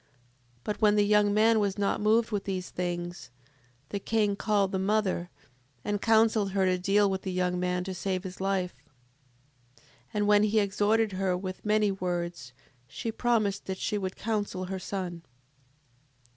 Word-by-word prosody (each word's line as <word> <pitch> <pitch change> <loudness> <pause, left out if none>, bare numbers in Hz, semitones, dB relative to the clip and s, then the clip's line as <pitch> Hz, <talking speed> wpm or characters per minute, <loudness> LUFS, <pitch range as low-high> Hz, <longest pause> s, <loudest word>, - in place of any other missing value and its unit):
7:25. - - -37 0.6
But 210 - -4
when 210 -1 +5
the 205 -1 +4
young 210 0 +4
man 220 +2 +4
was 200 -1 0
not 200 0 0
moved 220 +2 +3
with 205 -2 -2
these 185 -2 -4
things, 175 -3 -4 0.6
the 200 - -3
king 210 -1 +1
called 200 -2 +1
the 190 - -1
mother, 190 -3 0 0.6
and 205 -1 -1
counselled 220 -3 +3
her 195 -1 +2
to 185 -1 +1
deal 200 +3 +3
with 190 -1 -2
the 190 - -4
young 180 0 0
man 180 0 -1
to 190 0 -5
save 185 0 -2
his 185 -1 -8
life. 190 -2 0 1.0
7:26. - - -25 0.3
And 205 0 +1
when 205 0 +5
he 215 +1 +2
had 210 - +5
exhorted 210 +2 +1
her 185 -1 0
with 185 0 -6
many 210 -1 +2
words 175 -7 -3 0.4
she 190 +11 -4
promised 220 -4 0
that 190 -1 -3
she 210 - -1
would 190 -1 -4
counsel 205 -4 -2
her 190 +1 -4
son. 185 -3 -4
195 Hz, 175 wpm, -28 LUFS, 185-210 Hz, 1.0 s, when